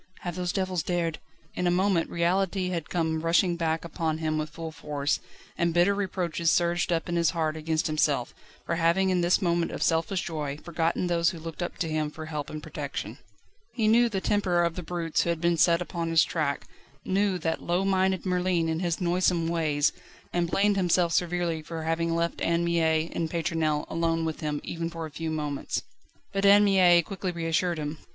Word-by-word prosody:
Have 175 - -4
those 180 0 -2
devils 185 -3 -1
dared 165 -2 -1 0.2
..." - - -34
In 180 - -1
a - - +4
moment 180 -1 +2
reality 185 +2 0
had 170 -4 -3
come 160 -2 0
rushing 170 +2 +3
back 165 -1 -1
upon 160 -1 -2
him 155 -1 -1
with 155 0 -3
full 160 +1 -7
force, 145 -2 -2 0.4
and 170 -1 +1
bitter 175 +3 +4
reproaches 175 -4 -1
surged 175 +1 +2
up 165 +1 0
in 175 - -2
his 170 -2 +3
heart 155 -1 0
against 160 0 -1
himself, 150 -5 +1 0.3
for 170 - -1
having 170 +3 +3
in 180 -1 +2
this 175 +3 +2
moment 170 -1 +1
of - - -2
selfish 165 +3 +1
joy 150 -5 -4
forgotten 165 +2 -1
those 170 -1 +2
who 175 - -6
looked 165 +1 -7
up 175 - -4
to 165 - -1
him 155 -1 -1
for 155 +1 -8
help 150 -2 -4
and 155 0 -7
protection. - - -5 0.6
He 225 -3 +1
knew 235 +2 +5
the 195 -3 -1
temper 185 -5 +2
of 170 -1 0
the 180 - -5
brutes 165 -1 -1
who - - -1
had 170 -1 0
been 170 +1 +2
set 170 +1 +4
upon 170 -1 -4
his 165 -1 +5
track, 150 -4 -2 0.4
knew 195 0 +1
that 165 -2 -2
low 175 +3 0
minded 190 -1 +1
Merlin 180 -2 +1
and 160 +1 -1
his 175 -2 -1
noisome 175 -1 +1
ways, 155 -4 +1 0.4
and 175 -1 0
blamed 200 +2 +2
himself 175 -2 +2
severely 175 -2 0
for 160 +1 -6
having 165 +1 0
left 170 0 -1
Anne 170 +1 +1
Mie 165 -1 +1
and 165 -1 -2
Pétronelle 160 -2 0
alone 165 0 0
with 160 -1 -3
him 150 -2 -2
even 165 0 -4
for 165 -1 -6
a 155 - -9
few 160 +2 -4
moments. 150 -3 -3 0.5
But 195 0 -1
Anne 200 +1 +7
Mie 180 -4 +5
quickly 190 +2 -4
reassured 170 +1 0
him. 150 0 -4
170 Hz, 205 wpm, -27 LUFS, 160-180 Hz, 0.6 s, Anne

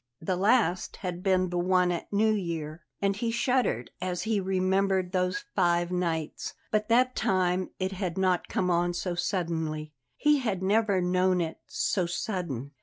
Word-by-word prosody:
The 180 +3 -1
last 200 -1 +2
had 180 -1 -3
been 185 -1 +2
the 175 - 0
one 180 0 +3
at 170 - -4
New 215 +2 +3
Year; 165 -5 -3 0.2
and 200 0 +2
he 230 +3 -1
shuddered 235 - 0
as 180 -1 -2
he 220 -2 +1
remembered 190 0 +1
those 180 -1 -1
five 175 -2 +2
nights. 165 -4 -2 0.2
But 215 0 +1
that 255 +2 +3
time 185 -1 +1
it 190 0 -1
had 185 -2 -3
not 185 -2 +1
come 180 -1 0
on 175 0 +1
so 180 0 -2
suddenly; 165 -4 -2 0.2
he 300 -1 +4
had 205 -7 -2
never 200 -1 +2
known 180 +1 +2
it 165 -2 -3
so 185 -4 0
sudden. 170 - -3
185 Hz, 165 wpm, -28 LUFS, 175-195 Hz, 0.2 s, he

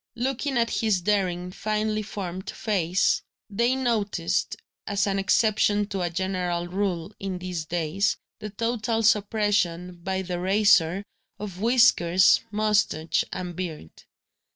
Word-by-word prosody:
Looking 265 +2 -1
at 230 -1 +1
his 215 -4 +1
daring, 180 -2 0
finely 215 +2 -1
formed 190 -3 -6
face, 190 -3 +1 0.3
they 235 +5 +2
noticed 210 -8 -1 0.3
(as 200 +1 +1
an 195 -1 0
exception 205 +1 +2
to 195 -2 -3
a 175 - 0
general 180 -1 -2
rule, 185 -1 -2
in 195 -2 -4
these 180 -3 -4
days) 175 +4 0 0.2
the 215 - -6
total 225 +1 -1
suppression, 205 -5 +1
by 190 +1 -2
the 180 -1 -4
razor, 190 -1 +3 0.3
of 195 -3 -7
whiskers, 220 -7 +5
moustache, 210 -6 +1
and 180 -1 -5
beard. 160 - -6
195 Hz, 125 wpm, -25 LUFS, 180-215 Hz, 0.3 s, whiskers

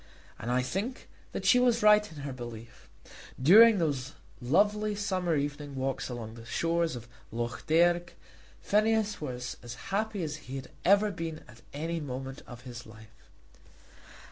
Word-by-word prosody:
And 115 - -5
I 125 +1 +2
think 205 - -4 0.2
that - - -5
she 250 - +6
was 240 -3 +3
right 210 -1 +6
in 150 -3 -9
her 140 -2 -4
belief. 120 -2 -10 0.5
During 210 - +8
those 145 -5 -1 0.3
lovely 205 +10 +2
summer 185 -4 0
evening 145 0 -3
walks 135 0 -2
along 115 -3 -6
the 115 0 -11
shores 165 +5 0
of 120 -1 -8 0.2
Lough 120 +2 -3
Derg, 175 +2 +3 0.5
Phineas 215 -1 +2
was 125 -3 -5
as 120 0 -8 0.2
happy 210 -2 0
as 155 -1 -3
he 135 -3 -9
had 135 -1 -7
ever 205 +2 +4
been 165 -4 -5
at 115 +2 -16
any 165 +3 -3
moment 135 -1 -6
of 120 -1 -10
his 120 -2 -9
life. 110 0 -16
150 Hz, 155 wpm, -30 LUFS, 125-200 Hz, 0.5 s, During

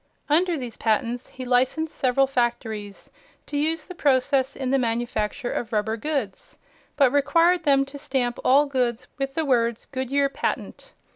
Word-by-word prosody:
Under 340 +3 +3
these 245 -4 -6
patents 235 +2 -1
he 260 - -8
licensed 260 +6 +1
several 265 +1 +2
factories 230 -5 -3 0.3
to - - -7
use 310 +2 0
the 365 - -9
process 270 -3 +1
in 260 -2 -3
the 275 - +3
manufacture 235 +1 -2
of 235 -1 -4
rubber 220 0 0
goods, 230 -5 -4 0.4
but 275 -4 +5
required 330 +5 +3
them 275 -1 +4
to 280 +1 -10
stamp 260 -4 -1
all 280 +3 +5
goods 250 -4 -1
with 270 0 -3
the 320 - 0
words 235 -4 +1
"Goodyear 275 +1 0
patent." 275 - -4
260 Hz, 155 wpm, -24 LUFS, 240-285 Hz, 0.4 s, but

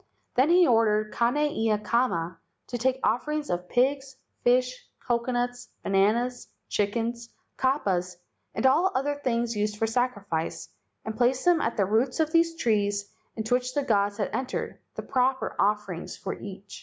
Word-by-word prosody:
Then 260 +5 +3
he 355 +1 +6
ordered 215 -4 +2
Kane 235 +4 +1
ia 225 -8 +1
kama 210 -6 0 0.3
to 245 - -2
take 260 +2 +1
offerings 300 +3 0
of 175 +1 -3
pigs, 270 +2 +1 0.3
fish, 250 +1 +2 0.2
co¬ 235 -2 +1
conuts, 245 0 -2 0.2
bananas, 225 +6 +1 0.2
chickens, 230 +3 -1 0.3
kapas, 190 -10 0 0.4
and - - -1
all 330 +9 +4
other 285 +2 -1
things 235 -2 0
used 210 0 -1
for 225 - +1
sacrifice, 205 -9 -2 0.4
and 220 - -4
place 250 +4 +1
them 350 -3 +4
at 230 - -1
the 200 - +3
roots 230 - +1
of 315 -1 +2
these 330 0 +3
trees 205 -6 0 0.2
into 220 +1 -2
which 250 0 0
the 290 - +1
gods 205 -4 +1
had 205 - -2
entered, 260 0 -3 0.2
the - - -5
proper 260 0 0
offerings 205 -4 -1
for 190 - -4
each. 200 0 -9
235 Hz, 155 wpm, -27 LUFS, 210-260 Hz, 0.4 s, he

